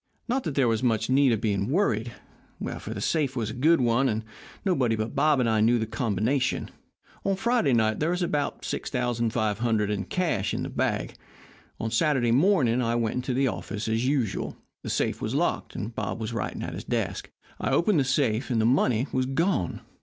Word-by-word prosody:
Not 255 +2 0
that 150 - -3
there 135 -3 +3
was 115 0 +1
much 115 -1 +1
need 135 -1 +5
of 115 - +1
being 100 -1 0
worried, 120 - +1 0.7
for - - -7
the - - -4
safe 145 -5 0
was 110 -3 -2
a - - -6
good 155 +7 +3
one, 125 +2 +2
and 110 0 -1 0.4
nobody 130 - +2
but 110 +1 -3
Bob 150 -3 +3
and 125 - +2
I 110 -1 +2
knew 120 +2 +4
the 110 - -1
combination. 125 +3 -1 0.5
On 195 0 +1
Friday 230 - +2
night 110 -2 +2
there 155 - +1
was 180 +1 0
about 145 -4 -1
$6,500 115 -3 0
in 100 -1 -2
cash 165 - -1
in - - -2
the - - -4
bag. - - -1 0.7
On 115 - -2
Saturday 125 -1 +2
morning 130 - +3
I 115 -1 0
went 120 +1 -1
to 130 - -1
the 135 +1 +2
office 110 -2 -4
as 115 +3 0
usual. 130 -7 -1 0.2
The - - -6
safe - - -1
was - - -2
locked, - - -1
and 110 +3 -4
Bob - - -3
was 110 +1 -4
writing 95 -6 -3
at - - -5
his - - -6
desk. - - -2 0.3
I - - -1
opened 170 -1 +3
the - - +3
safe, 130 -3 0
and 120 -3 +1
the 110 - +2
money 125 -1 +3
was 130 0 0
gone. 150 - 0
120 Hz, 200 wpm, -26 LUFS, 110-140 Hz, 0.7 s, need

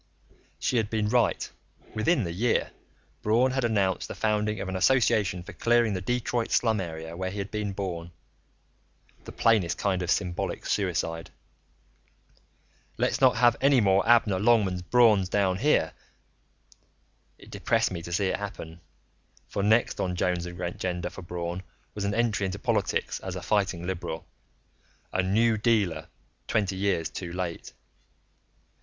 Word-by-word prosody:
She 125 - 0
had 110 -2 0
been 110 -2 0
right; 120 0 +2 0.5
within 125 +5 +2
the 85 - -3
year, 115 +7 +1 0.5
Braun 120 +5 +3
had 130 0 -1
announced 100 -5 +1
the - - -7
founding 105 -1 0
of 95 - -4
an 95 - -4
association 100 -4 +2
for 105 - -10
clearing 115 +3 +2
the 90 - -3
Detroit 120 +2 -1
slum 110 -4 +2
area 80 -1 -6
where 95 +1 -3
he 100 - -7
had 100 0 -4
been 105 -2 -2
born 90 -4 -4 1.2
the - - -8
plainest 105 -7 +2
kind 95 -2 0
of 90 - -3
symbolic 90 -3 -1
suicide: 80 -4 -1 1.7
Let's - - 0
not 130 -1 +6
have 120 -1 +4
any 135 -1 +5
more 95 -2 +4
Abner 110 -5 +4
Longmans 100 -4 +3
Brauns 105 -2 +4
born 100 +1 +2
down 95 -1 +1
here. 125 - +2 1.4
It - - -16
depressed - - +1
me 85 -2 -4
to 85 - -8
see 95 +3 +1
it - - -1
happen, 85 -5 -7 0.7
for 100 - -3
next 110 +4 +2
on 90 -1 -1
Joan's 90 -1 0
agenda 90 0 -4
for - - -9
Braun 85 0 -4 0.3
was 100 -1 -3
an 100 +1 -1
entry 110 -4 +1
into 95 +1 -4
politics - - -1
as 95 -1 -6
a 90 - -6
fighting 95 -5 0
liberal 85 -3 -4 0.9
a 95 - +2
New 110 +4 +2
Dealer 105 -6 +1 0.4
twenty 100 -3 0
years 95 -4 0
too 90 0 -7
late. 90 -1 -5
100 Hz, 150 wpm, -27 LUFS, 90-110 Hz, 1.7 s, not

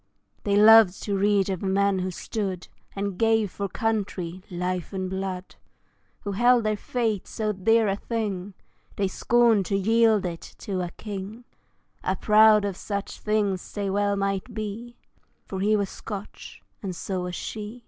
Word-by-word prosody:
They 200 -1 +2
loved 215 -2 +7
to 205 - -1
read 200 0 +2
of 190 -3 -3
men 195 0 +2
who 185 0 -2
stood 190 -1 -4 0.3
And 200 -2 -3
gave 225 -3 +2
for 200 -1 -4
country, 190 -5 -2
life 180 0 -3
and 190 -1 -2
blood, 190 -1 -5 0.6
Who 205 - -4
held 240 +4 +4
their 215 0 +1
faith 220 -2 -2
so 215 -2 -2
dear 225 +3 +3
a 195 - +1
thing 205 -4 -3 0.4
They 200 - 0
scorned 230 0 +3
to 195 - +1
yield 220 0 +3
it 170 -2 -4 0.2
to 195 -4 -3
a 175 - -3
king; 210 +4 -7 0.6
Ah! 185 - 0
proud 215 0 +5
of 200 -2 -2
such 200 -1 -5
they 205 -1 -1
well 205 0 +1
might 195 +3 -2
be 220 +3 -6 0.5
For 190 - -5
he 210 +3 +3
was 200 -2 -1
Scotch, 205 -2 -8 0.2
and 190 -3 -4
so 185 +1 -3
was 180 0 -4
she. 215 +2 -6
200 Hz, 160 wpm, -25 LUFS, 190-215 Hz, 0.6 s, loved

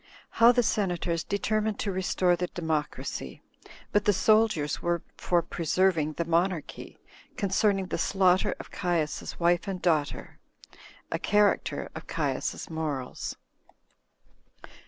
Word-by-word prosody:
How 230 +1 +6
The 245 0 +2
Senators 175 -6 0
Determined 215 +1 -1
To 205 - -1
Restore 185 -1 +1
The 180 +1 -2
Democracy; 155 - -4 0.5
But 205 0 +2
The 205 - +4
Soldiers 215 -7 +2
Were 170 -1 -1
For 175 -1 +1
Preserving 165 -2 +1
The 170 - -2
Monarchy, 170 0 -1 0.4
Concerning 195 0 +1
The 180 - -3
Slaughter 185 +2 +2
Of - - -10
Caius's 170 -5 -2
Wife 175 +2 +2
And 190 -2 -3
Daughter. 155 -5 -1 0.7
A - - -1
Character 205 0 +1
Of - - -9
Caius's - - -2
Morals. 150 -6 -4
180 Hz, 115 wpm, -28 LUFS, 165-200 Hz, 0.7 s, How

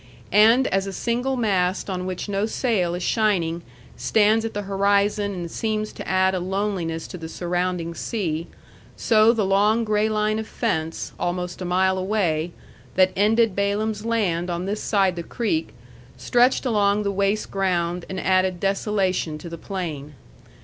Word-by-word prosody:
And 225 +5 +6
as 195 +1 0
a 195 - -5
single 245 +6 -1
mast 190 -5 0
on 185 -2 -3
which 185 +2 -4
no 205 +1 0
sail 205 -8 0
is 180 - -4
shining 175 -7 +1 0.3
stands 215 - +3
at 225 - -4
the 205 - -2
horizon 200 +1 +1
and 170 -2 -5
seems 215 -1 -2
to - - -8
add 190 0 +2
a 185 - 0
loneliness 185 -3 -2
to 180 - -8
the 160 0 -7
surrounding 175 -1 -2
sea, 170 -5 -3 0.5
so 220 0 +5
the 225 -4 0
long 205 +4 +3
gray 215 0 +1
line 215 0 0
of 220 - -5
fence, 165 -9 -2
almost 180 +1 -3
a - - -3
mile 185 +1 +2
away, 180 -5 0 0.4
that 185 0 +4
ended 215 +1 +3
Balaam's 205 +1 -1
land 190 -7 0
on 175 +1 -2
this 205 +2 -3
side 195 -4 +2
the 170 - -4
creek, 245 - -2 0.5
stretched 245 +2 +2
along 210 -3 +2
the 200 - 0
waste 200 +2 0
ground 180 -3 -1
and 190 - -4
added 185 -1 +1
desolation 195 -4 0
to 160 +3 -9
the 170 - -7
plain. 155 -7 -5
195 Hz, 165 wpm, -23 LUFS, 180-215 Hz, 0.5 s, And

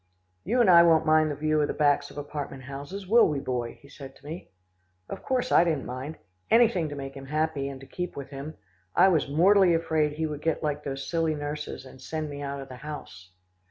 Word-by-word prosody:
"You 240 +7 +2
and 235 - +4
I 170 -2 +9
won't 165 -2 +4
mind 155 0 +4
the 145 - -3
view 155 +1 +1
of 145 - +1
the - - -4
backs 145 -1 +2
of - - -14
apartment 145 -2 -6
houses, 140 +9 -7
will 230 +4 +6
we, 145 -2 -1
Boy?" 125 -3 -3
he - - -14
said 135 -1 -11
to - - -20
me. 160 +4 -8 0.6
Of - - -7
course 255 -1 -1
I - - +6
didn't 160 -5 -1
mind. 130 +5 -6 0.3
Anything 225 -9 +4
to 145 - -6
make 135 -1 -6
him 135 -1 -10
happy, 150 -2 -1
and 135 -1 -8
to - - -10
keep 180 +5 -5
with 140 0 -7
him. 140 +3 -7 0.4
I 190 - +6
was 160 -6 +1
mortally 180 +4 +5
afraid 155 -2 +1
he 160 +1 -2
would 150 -1 -5
get 160 0 -1
like 150 -1 -2
those 135 -1 -5
silly 165 -2 0
nurses, 145 -2 -5
and 130 0 -14
send 155 +1 -4
me 145 0 -7
out 140 0 -4
of 135 - -9
the 130 -1 -10
house. 140 - -9
150 Hz, 230 wpm, -27 LUFS, 140-165 Hz, 0.6 s, I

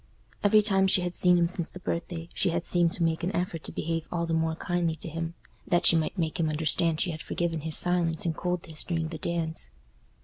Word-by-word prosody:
Every 210 +1 +5
time 195 -2 +3
she 190 - +6
had 175 0 -3
seen 180 -1 +4
him 170 -1 +3
since 170 -1 -4
the 185 - -10
birthday, 170 -1 -4
she - - +1
had 170 +1 -2
seemed 175 -1 +2
to 175 - -1
make 165 0 0
an 185 +4 -1
effort 175 -2 -2
to - - -3
behave 165 0 -3
all 170 -1 -1
the 165 - -2
more 160 0 0
kindly 175 -2 -1
to 160 - -6
him, 165 +1 -5 0.3
that 175 0 +2
she - - +7
might 160 +4 -1
make 165 0 -2
him 160 -2 +1
understand 160 +1 +3
she 180 - +1
had 155 -1 -7
forgiven 165 -2 -2
his 160 +1 +2
silence 175 -2 +1
and 165 -2 -1
coldness 175 -3 -3
during 165 -2 -2
the 160 -2 -7
dance. 160 - -2
170 Hz, 235 wpm, -27 LUFS, 160-175 Hz, 0.3 s, she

